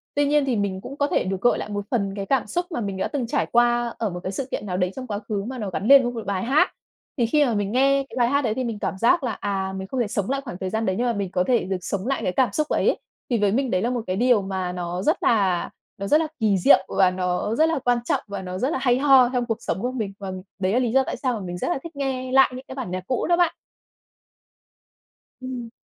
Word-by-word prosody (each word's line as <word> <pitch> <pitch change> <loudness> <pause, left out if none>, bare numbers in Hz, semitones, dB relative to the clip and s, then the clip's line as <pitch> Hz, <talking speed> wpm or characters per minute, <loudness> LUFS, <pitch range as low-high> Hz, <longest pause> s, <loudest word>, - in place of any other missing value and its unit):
Tuy 290 0 +3
nhiên 290 0 +3
thì 260 -3 0
mình 200 -3 -2
cũng 275 +7 -8
có 285 - +1
thể - - +1
được 190 0 -3
gợi 245 - +3
lại - - -5
một 205 -1 -4
phần 200 -5 0
cái 200 -1 -4
cảm 265 0 +1
xúc 350 +11 -1
mà 245 - -2
mình 200 -3 -3
đã 190 - -1
từng 260 -5 -3
trải 275 +4 0
qua 240 0 +2
ở 220 - -1
một 180 -1 -6
cái 185 - -3
sự 255 +7 -4
kiện - - -3
nào 180 -2 -2
đấy 180 -1 0
trong 255 -1 -6
quá 205 -3 -3
khứ 205 -1 -3
mà 260 +1 -5
nó 210 -5 -3
gắn 195 +4 -3
lên 275 -1 +8
với 245 - -1
một 230 -2 -6
bài 195 -1 -2
hát. 270 +6 +3 0.5
Thì 240 - +2
khi 295 +6 +3
mà 240 - 0
mình 205 -1 -1
nghe 275 +3 +3
cái - - -10
bài 240 -1 +3
hát 280 +2 +2
đấy 220 - +1
thì 260 +3 -2
mình 230 -4 -4
cảm 190 - -3
giác 270 - +3
là, 245 - 0
à, 195 -1 -2
mình 190 0 -5
không 260 - -3
thể 235 - +1
sống 205 0 -2
lại 275 +1 0
khoảng 240 -10 -7
thời 190 0 -3
gian 220 +3 -1
đấy 185 - 0
nhưng 245 - +1
mà 240 - +1
mình 200 -4 -3
có 180 - +1
thể 245 -2 +3
được 190 +1 -2
sống 200 +4 -3
lại 270 - 0
cái - - 0
cảm 255 +6 +2
xúc 305 -1 0
ấy. - - +2 0.3
Thì 240 - +2
với 205 -1 +2
mình 255 +3 0
đấy 185 - +1
là 235 - 0
một 245 -1 -1
cái 185 - -1
điều 240 0 +3
mà 190 -2 -3
nó 180 0 -4
rất - - +1
là 195 -6 +2 0.3
nó 200 - -4
rất 300 - +5
là 320 - -1
kỳ 210 -4 +2
diệu 185 +1 +5
và 190 -2 +3
nó 180 +3 -1
rất 315 +5 +3
là 325 - 0
quan 245 0 +3
trọng, - - 0
và 200 -1 -5
nó 185 0 -5
rất 255 +8 0
là - - 0
hay 245 -2 +3
ho 265 -3 +6
trong 245 -1 0
cuộc 225 -2 -2
sống - - -3
của 250 +2 -1
mình. 220 -6 -4
Và 195 -2 -5 0.3
đấy 190 +1 0
là 245 - +3
lý 245 -3 0
do 265 +2 +4
tại - - -4
sao 255 -2 -1
mà 225 - -3
mình 175 0 -5
rất - - -3
là 350 - 0
thích 335 -2 -9
nghe 260 -2 -3
lại 265 0 +5
những 260 +1 -9
cái 260 - -8
bản 255 -9 -5
nhạc 185 0 -3
cũ 255 - 0
đó 345 0 +3
bạn. 345 -2 +3 1.9
Ừm. 255 -2 -6
230 Hz, 305 wpm, -23 LUFS, 195-260 Hz, 1.9 s, lên